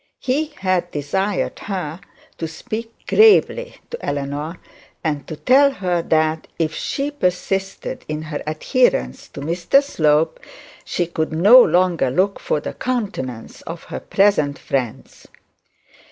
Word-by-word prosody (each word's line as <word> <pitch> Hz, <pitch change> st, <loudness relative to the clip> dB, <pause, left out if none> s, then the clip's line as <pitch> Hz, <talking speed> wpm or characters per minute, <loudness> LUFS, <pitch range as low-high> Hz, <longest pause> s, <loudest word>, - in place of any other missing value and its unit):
He 285 Hz, +5 st, 0 dB
had 185 Hz, -2 st, +1 dB
desired 190 Hz, +8 st, -2 dB
her 180 Hz, -4 st, -4 dB, 0.4 s
to 165 Hz, -, -2 dB
speak 220 Hz, +8 st, -6 dB
gravely 445 Hz, +3 st, +4 dB, 0.2 s
to 475 Hz, -, -7 dB
Eleanor, 145 Hz, +4 st, -3 dB, 0.5 s
and 150 Hz, -3 st, -2 dB
to 160 Hz, -, -5 dB
tell 270 Hz, -, +5 dB
her 180 Hz, -10 st, -1 dB
that, 155 Hz, -1 st, +1 dB
if 160 Hz, -2 st, 0 dB
she 285 Hz, +1 st, -2 dB
persisted 195 Hz, -5 st, -2 dB
in 155 Hz, 0 st, -4 dB
her 155 Hz, -2 st, -5 dB
adherence 155 Hz, -, +1 dB
to 140 Hz, -, -9 dB
Mr 170 Hz, -, +2 dB
Slope, 155 Hz, -, +1 dB, 0.4 s
she 175 Hz, -, -1 dB
could 160 Hz, -2 st, -2 dB
no 205 Hz, +11 st, +8 dB
longer 180 Hz, -, +3 dB
look 190 Hz, +9 st, +1 dB
for -, -, -1 dB
the -, -, -6 dB
countenance 200 Hz, -, -4 dB
of -, -, -8 dB
her -, -, -6 dB
present 175 Hz, -9 st, +2 dB
friends. 125 Hz, -5 st, -4 dB
175 Hz, 130 wpm, -20 LUFS, 155-210 Hz, 0.5 s, no